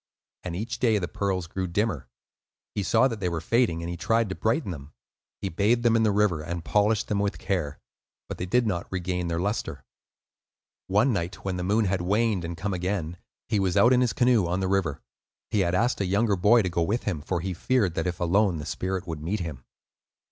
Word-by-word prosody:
And 90 Hz, -2 st, -4 dB
each 110 Hz, +7 st, -4 dB
day 115 Hz, -4 st, +3 dB
the 90 Hz, -3 st, -2 dB
pearls 95 Hz, -3 st, -2 dB
grew 95 Hz, +3 st, -3 dB
dimmer. 85 Hz, -, -1 dB, 0.7 s
He 105 Hz, -, -1 dB
saw 115 Hz, +6 st, +4 dB
that 115 Hz, -4 st, -5 dB
they 90 Hz, -3 st, 0 dB
were 85 Hz, -1 st, -2 dB
fading, 85 Hz, -2 st, +1 dB
and 85 Hz, -, -4 dB
he -, -, -4 dB
tried 115 Hz, +4 st, +1 dB
to -, -, -2 dB
brighten 115 Hz, -, 0 dB
them. 70 Hz, -3 st, -9 dB, 0.5 s
He -, -, 0 dB
bathed 105 Hz, +7 st, +1 dB
them 115 Hz, -1 st, +4 dB
in 115 Hz, -, +4 dB
the 110 Hz, -2 st, +3 dB
river 100 Hz, -6 st, +2 dB
and 85 Hz, +1 st, -5 dB
polished 105 Hz, +1 st, +2 dB
them 105 Hz, -2 st, 0 dB
with 100 Hz, 0 st, -1 dB
care, 85 Hz, -7 st, -2 dB, 0.5 s
but -, -, -6 dB
they 90 Hz, -, -3 dB
did 125 Hz, +6 st, +2 dB
not 90 Hz, -5 st, -2 dB
regain 90 Hz, -1 st, -2 dB
their 85 Hz, 0 st, -1 dB
lustre. 105 Hz, +5 st, -3 dB, 1.0 s
One 105 Hz, +7 st, +3 dB
night 90 Hz, -1 st, -4 dB
when 95 Hz, -2 st, -1 dB
the 90 Hz, -, -3 dB
moon 105 Hz, +4 st, +2 dB
had 95 Hz, -1 st, 0 dB
waned 105 Hz, +1 st, +1 dB
and 85 Hz, 0 st, -5 dB
come 100 Hz, +4 st, -2 dB
again, 90 Hz, -2 st, -2 dB, 0.3 s
he 110 Hz, -3 st, +1 dB
was 95 Hz, -2 st, +1 dB
out 120 Hz, +2 st, +6 dB
in 125 Hz, -, +4 dB
his 125 Hz, -3 st, +2 dB
canoe 120 Hz, -7 st, +3 dB
on 90 Hz, +2 st, -1 dB
the 95 Hz, -, 0 dB
river. 95 Hz, -7 st, 0 dB, 0.5 s
He 105 Hz, -, +1 dB
had 90 Hz, -1 st, +1 dB
asked 120 Hz, +3 st, +1 dB
a -, -, +1 dB
younger 100 Hz, +2 st, +2 dB
boy 105 Hz, +5 st, +5 dB
to 90 Hz, -, -1 dB
go 85 Hz, 0 st, -1 dB
with 105 Hz, +9 st, 0 dB
him, 90 Hz, -8 st, -2 dB
for 85 Hz, +4 st, -2 dB
he 95 Hz, +1 st, -3 dB
feared 105 Hz, -1 st, +1 dB
that, 80 Hz, +2 st, -1 dB
if 90 Hz, 0 st, -3 dB
alone, 95 Hz, +1 st, +2 dB
the 75 Hz, -, -6 dB
spirit 95 Hz, +3 st, -3 dB
would 80 Hz, -4 st, -5 dB
meet 95 Hz, +6 st, -2 dB
him. 75 Hz, -8 st, -6 dB
95 Hz, 225 wpm, -26 LUFS, 85-105 Hz, 1.0 s, out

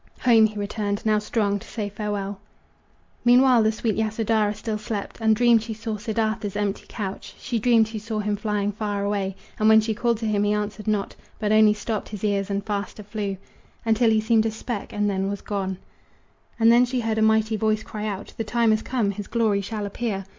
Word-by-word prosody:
Home 225 Hz, -3 st, +6 dB
he 215 Hz, 0 st, -10 dB
returned, 205 Hz, 0 st, -3 dB
now 215 Hz, -1 st, +3 dB
strong 210 Hz, -1 st, 0 dB
to -, -, -14 dB
say 215 Hz, -3 st, -4 dB
farewell. 205 Hz, -1 st, -4 dB, 0.8 s
Meanwhile 245 Hz, 0 st, +6 dB
the 220 Hz, 0 st, +3 dB
sweet 220 Hz, 0 st, -1 dB
Yasodhara 220 Hz, -1 st, 0 dB
still 215 Hz, 0 st, -4 dB
slept, 215 Hz, -1 st, -5 dB
And 220 Hz, -1 st, +4 dB
dreamed 235 Hz, 0 st, +4 dB
she 220 Hz, 0 st, -5 dB
saw 220 Hz, 0 st, -4 dB
Siddartha's 220 Hz, -1 st, -2 dB
empty 205 Hz, -1 st, -2 dB
couch. 195 Hz, -3 st, -6 dB
She 235 Hz, -, -2 dB
dreamed 225 Hz, -1 st, +4 dB
she 220 Hz, 0 st, -5 dB
saw 220 Hz, +1 st, -4 dB
him 210 Hz, 0 st, 0 dB
flying 205 Hz, -1 st, -1 dB
far 205 Hz, -1 st, -3 dB
away, 200 Hz, -2 st, -1 dB, 0.2 s
And 215 Hz, 0 st, +4 dB
when 220 Hz, 0 st, +8 dB
she 220 Hz, 0 st, 0 dB
called 235 Hz, +1 st, 0 dB
to 225 Hz, -, -4 dB
him 205 Hz, -1 st, +1 dB
he 205 Hz, 0 st, +2 dB
answered 210 Hz, 0 st, -3 dB
not, 210 Hz, -2 st, -1 dB, 0.2 s
But 210 Hz, -1 st, -1 dB
only 215 Hz, -1 st, +6 dB
stopped 215 Hz, 0 st, -4 dB
his 210 Hz, -2 st, -8 dB
ears 200 Hz, -2 st, 0 dB
and 200 Hz, 0 st, -2 dB
faster 205 Hz, 0 st, -4 dB
flew 205 Hz, -2 st, -4 dB, 0.5 s
Until 225 Hz, +1 st, +3 dB
he 220 Hz, -1 st, +3 dB
seemed 220 Hz, 0 st, +3 dB
a -, -, +1 dB
speck, 220 Hz, 0 st, -5 dB
and 205 Hz, 0 st, 0 dB
then 195 Hz, -1 st, 0 dB
was 200 Hz, 0 st, -4 dB
gone. 190 Hz, -2 st, -3 dB, 0.8 s
And 225 Hz, 0 st, +6 dB
then 240 Hz, +1 st, +6 dB
she 250 Hz, 0 st, -1 dB
heard 220 Hz, -1 st, -1 dB
a -, -, +1 dB
mighty 220 Hz, 0 st, +3 dB
voice 215 Hz, 0 st, 0 dB
cry 215 Hz, 0 st, -5 dB
out: 205 Hz, -1 st, -5 dB
"The 225 Hz, -, -1 dB
time 230 Hz, +1 st, +2 dB
has 215 Hz, 0 st, +2 dB
come 230 Hz, -6 st, 0 dB
his 200 Hz, 0 st, -7 dB
glory 220 Hz, -4 st, +1 dB
shall 210 Hz, +1 st, -4 dB
appear!" 200 Hz, -2 st, -3 dB
215 Hz, 210 wpm, -24 LUFS, 205-225 Hz, 0.8 s, when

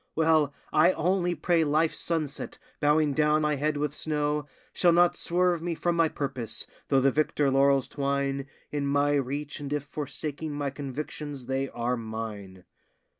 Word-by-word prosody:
Well, 160 Hz, -3 st, +3 dB, 0.2 s
I 170 Hz, +4 st, +5 dB
only 180 Hz, +1 st, +1 dB
pray 170 Hz, +1 st, +2 dB
life's 155 Hz, +2 st, +1 dB
sunset, 155 Hz, -4 st, -3 dB, 0.2 s
bowing 150 Hz, 0 st, +3 dB
down 150 Hz, +1 st, +3 dB
my 150 Hz, 0 st, +2 dB
head 150 Hz, +1 st, 0 dB
with 145 Hz, -1 st, -1 dB
snow, 150 Hz, -1 st, -1 dB, 0.3 s
Shall 175 Hz, -, +4 dB
not 175 Hz, 0 st, +5 dB
swerve 175 Hz, -1 st, +1 dB
me 170 Hz, 0 st, -2 dB
from 175 Hz, +1 st, 0 dB
my 165 Hz, -1 st, +3 dB
purpose, 130 Hz, -7 st, -4 dB, 0.2 s
though 135 Hz, -2 st, +3 dB
the 135 Hz, +1 st, +4 dB
victor 145 Hz, -1 st, +1 dB
laurels 135 Hz, 0 st, +4 dB
twine 140 Hz, -1 st, -1 dB, 0.2 s
In 145 Hz, -1 st, -1 dB
my 145 Hz, +1 st, +2 dB
reach, 145 Hz, +2 st, -2 dB
and 145 Hz, -1 st, -6 dB
if 145 Hz, -1 st, -1 dB
forsaking 150 Hz, +1 st, -5 dB
my 145 Hz, -1 st, -2 dB
convictions 145 Hz, 0 st, -6 dB
they 135 Hz, +1 st, -1 dB
are 120 Hz, +1 st, -1 dB
mine. 110 Hz, -5 st, -6 dB
145 Hz, 160 wpm, -28 LUFS, 135-155 Hz, 0.3 s, I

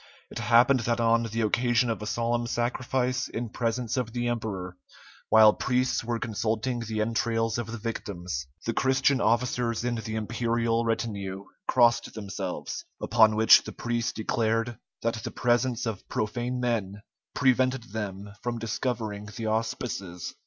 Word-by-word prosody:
It -, -, -5 dB
happened 125 Hz, +3 st, +5 dB
that 120 Hz, 0 st, 0 dB
on 115 Hz, 0 st, +4 dB
the 115 Hz, +2 st, -2 dB
occasion 120 Hz, +2 st, +2 dB
of 110 Hz, -, -4 dB
a 105 Hz, -, -4 dB
solemn 120 Hz, +1 st, 0 dB
sacrifice 125 Hz, +2 st, -1 dB
in 115 Hz, 0 st, -4 dB
presence 115 Hz, +1 st, -2 dB
of 120 Hz, -3 st, -2 dB
the 120 Hz, -1 st, -1 dB
emperor, 100 Hz, -6 st, -3 dB, 0.5 s
while 110 Hz, -1 st, +8 dB
priests 125 Hz, -1 st, 0 dB
were 120 Hz, 0 st, -1 dB
consulting 115 Hz, +2 st, -1 dB
the 110 Hz, -2 st, -2 dB
entrails 115 Hz, 0 st, 0 dB
of 115 Hz, -1 st, -4 dB
the 115 Hz, -, -4 dB
victims, 90 Hz, -, -4 dB, 0.2 s
the 115 Hz, -, 0 dB
Christian 135 Hz, +1 st, +2 dB
officers 115 Hz, 0 st, +1 dB
in 125 Hz, -, 0 dB
the 110 Hz, -1 st, -4 dB
imperial 115 Hz, +1 st, 0 dB
retinue 100 Hz, -4 st, -2 dB, 0.2 s
crossed 120 Hz, -2 st, +3 dB
themselves; 100 Hz, -3 st, -5 dB, 0.2 s
upon 110 Hz, -1 st, +4 dB
which 110 Hz, +1 st, +8 dB
the -, -, -7 dB
priests 120 Hz, -1 st, -1 dB
declared 115 Hz, +1 st, -1 dB, 0.2 s
that 115 Hz, -1 st, -1 dB
the 120 Hz, -, -3 dB
presence 120 Hz, +1 st, +1 dB
of 110 Hz, -4 st, -5 dB
profane 120 Hz, +4 st, -2 dB
men 105 Hz, -5 st, -2 dB, 0.3 s
prevented 130 Hz, -2 st, +2 dB
them 100 Hz, -2 st, -5 dB
from 120 Hz, -1 st, -2 dB
discovering 110 Hz, -2 st, -3 dB
the 115 Hz, -, -4 dB
auspices. 110 Hz, -5 st, -3 dB
115 Hz, 145 wpm, -27 LUFS, 110-120 Hz, 0.5 s, while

